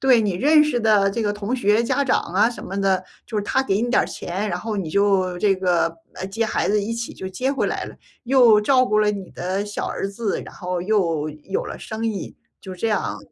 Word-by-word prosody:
对， 260 -3 +5
你 210 -3 0
认 300 - +5
识 300 -5 0
的 210 -3 +4
这 230 - -3
个 205 - 0
同 210 +5 -3
学 215 -1 +3
家 265 +4 +1
长 - - +2
啊 200 +6 +2
什 240 - -9
么 195 +1 -4
的， 190 -1 +2 0.2
就 220 - -5
是 205 - 0
他 265 +6 +1
给 200 -2 +1
你 240 - -1
点 - - +4
儿 - - -3
钱， 200 +4 -4
然 175 - -1
后 220 -1 -3
你 190 -5 -3
就 195 -2 +2
这 195 -2 +3
个， 175 -3 +1 0.2
呃， 185 - -6
接 220 +4 -1
孩 - - 0
子 210 0 +2
一 220 +3 -3
起 230 0 -4
就 190 - -6
接 250 +9 -1
回 275 - 0
来 - - -2
了。 - - -11 0.3
又 240 -4 +6
照 255 +3 +4
顾 215 - +2
了 210 -1 +3
你 195 -3 -6
的 190 +3 -2
小 205 - -4
儿 - - -3
子， 205 +1 -2
然 - - -11
后 180 -1 -3
又 170 -7 +1
有 155 +6 -4
了 - - -6
生 225 +1 -4
意， 210 -4 -4 0.2
就 190 - -8
这 225 - -2
样。 185 - -1
205 Hz, 265 characters per minute, -22 LUFS, 190-230 Hz, 0.3 s, 又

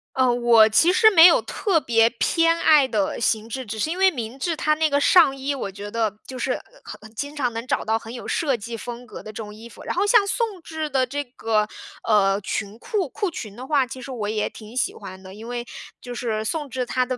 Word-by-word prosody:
啊， 260 -1 +3
我 235 -2 +5
其 330 +11 +4
实 440 +2 +6
没 330 -5 +8
有 345 - +7
特 365 -8 0
别 225 -1 +3
偏 330 +7 +2
爱 300 -5 +5
的 210 -5 -1
形 225 -1 0
制。 260 +2 -5
只 220 +1 -6
是 305 - 0
因 345 - -3
为 380 0 +4
明 240 -3 -6
制 330 +4 -2
它 305 0 +1
那 315 0 +2
个 285 0 +1
上 285 -4 +5
衣， 275 +1 -3
我 200 -7 -5
觉 200 +2 -8
得 220 -2 -1
就 260 - -7
是 - - -1 0.3
很 - - -10
很 220 +1 -15
经 285 +5 -5
常 255 -5 -1
能 230 +1 -5
找 - - -1
到 220 +1 +1
很 225 +1 -10
有 245 - -8
设 290 -6 0
计 230 +1 -7
风 240 +2 -8
格 - - -10
的 215 - -8
这 - - -23
种 210 -1 -9
衣 225 +2 -11
服。 - - -14
然 - - -4
后 380 +3 +1
像 415 -1 +5
宋 405 -2 -2
制 315 -1 -5
的 265 -2 +1
这 290 +3 -3
个， 225 -4 -1 0.4
呃， 200 -3 +3
裙 200 +1 -4
裤 365 - -2
裤 400 - -3
裙 215 -9 -8
的 250 +3 -8
话， 275 -3 +2
其 260 0 -8
实 270 - -8
我 215 -5 -3
也 215 -1 -1
挺 220 +2 -11
喜 255 - 0
欢 190 -2 -10
的。 190 0 -11
因 220 +3 -10
为 240 0 -4 0.3
就 245 - -8
是 220 -3 -2
宋 295 +4 -3
制 255 0 -3
它 255 +1 0
的， 255 0 -3
245 Hz, 275 characters per minute, -23 LUFS, 220-300 Hz, 0.4 s, 没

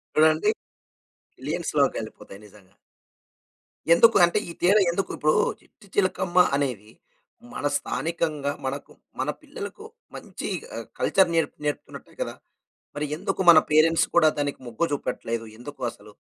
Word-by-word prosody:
చూడండీ 155 +6 +4 0.9
మిలియన్స్‌లోకెళ్ళిపోతాయి 100 - -2
నిజంగా. 100 -1 -20 1.2
ఎందుకు 230 +6 +6
అంటే, 175 +5 0
ఈ - - -5
తీర 185 +4 +5 0.2
ఎందుకు? 195 +3 -2
ఇప్పుడు 155 0 +2 0.3
'చిట్టి 205 - -22
చిలకమ్మ' 185 -2 +3
అనేది, 120 -7 -2 0.6
మన 145 - -5
స్థానికంగా 150 -1 -2
మనకు, 140 +2 -5 0.3
మన - - -1
పిల్లలకు 430 -2 -8 0.3
మంచి - - -7 0.3
ఆహ్, - - -6
కల్చర్ 185 -3 +3
నేరపు 165 - 0
నేర్పుతున్నట్టే 145 - -5
కదా - - -3 0.6
మరి. 150 +1 -2
ఎందుకు 190 - -2
మన 165 -2 +10
పేరెంట్స్ 160 +2 +4
కూడా 160 -2 +6
దానికి 145 -1 -2
మొగ్గు 120 +8 -1
చూపట్లేదు, 115 -4 -3
ఎందుకు 130 +3 -10
అసలు? 105 - -16
155 Hz, 120 wpm, -25 LUFS, 140-175 Hz, 1.2 s, మన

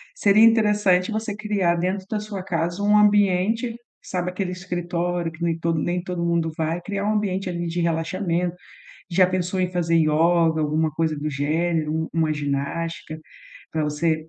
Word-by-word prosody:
Seria 205 +2 +5
interessante 210 -4 +4
você 215 -1 -3
criar 205 -5 0
dentro 185 +3 -2
da 215 - -1
sua 210 -3 -6
casa 175 +1 -2
um 210 +1 +5
ambiente, 210 +3 +3 0.3
sabe, 180 -1 -3
aquele 185 0 -3
escritório 175 -2 -2
que 160 +2 -8
nem 165 -1 0
todo 165 -1 0
nem 175 +2 -1
todo 180 -2 -3
mundo 170 -1 0
vai, 160 +2 -1
criar 200 +2 -3
um 210 - +1
ambiente 195 -3 -1
ali 175 -1 -3
de 170 +1 -2
relaxamento. 170 +1 -1 0.6
Já 180 +1 +5
pensou 185 0 -1
em 180 -1 0
fazer 170 -2 +1
ioga, 160 +1 +3
alguma 155 +1 +1
coisa 160 0 -1
do 150 +1 -2
gênero, 155 +2 0
u 160 0 -2
uma 160 -1 +1
ginástica 150 +3 -3 0.5
pra 160 - 0
você 155 +1 -1
175 Hz, 170 wpm, -23 LUFS, 160-190 Hz, 0.6 s, Seria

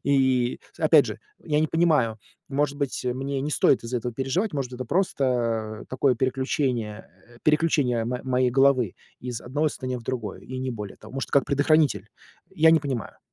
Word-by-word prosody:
И, 130 -3 +2
с - - -19
опять - - +6
же, - - -5 0.2
я 150 -2 0
не 155 - +2
понимаю, 150 -10 +2 0.3
может 140 +1 0
быть, 140 -3 -2
мне 135 +2 -2
не 145 +3 -2
стоит 135 - +3
из-за 120 +2 -2
этого 120 0 -3
переживать, 135 - -1
может, 135 -3 -3
это 130 - -5
просто, 170 -1 0 0.6
э, - - -11
такое 130 0 +2
переключение, 130 -3 -1 0.2
э, 120 0 -18
переключение 150 -7 +2
мо 125 +2 -3
моей 130 -1 +2
головы, 135 -4 +3 0.3
из 120 -2 -5
одного 145 +5 0
состояния 130 -3 -4
в - - -12
другое, 115 -4 -4
и 130 0 -7
не 130 0 -2
более 105 -4 -7
того. 110 - -14
Может, 135 - -4
как 140 -3 +4
предохранитель? 140 -7 +2 0.4
Я 160 +1 +5
не 160 - +4
понимаю. 130 -7 -4
130 Hz, 185 wpm, -25 LUFS, 120-145 Hz, 0.6 s, опять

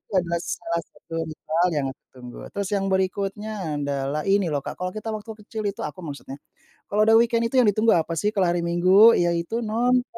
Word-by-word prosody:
itu - - -48
adalah 170 -1 0
salah 170 -1 -3
satu, 165 - -20 0.2
misal 160 +2 0
yang 140 - 0
aku - - -31 0.2
tunggu, 125 -1 -10 0.2
terus 200 -1 -2
yang 195 -1 0
berikutnya 195 -2 -2
adalah, 140 +1 -2
ini 195 -2 +2
loh 145 - +1
Kak, - - -5
kalau 180 - -1
kita 215 +3 -7
waktu 215 +1 -7
kecil 220 0 -5
itu, 200 - -11
aku 150 +5 -6
maksudnya. 140 -3 -7 0.5
Kalau 210 +1 +1
udah 225 - +7
weekend 230 0 +2
itu 265 - -2
yang 250 - +6
ditunggu 215 +2 +3
apa 165 +1 -2
sih, 205 +6 0
kalau 195 -4 +1
hari 175 - 0
Minggu 185 +6 +6
yaitu, 175 +5 0
nonton. 245 +3 +2
190 Hz, 205 wpm, -24 LUFS, 165-215 Hz, 0.5 s, udah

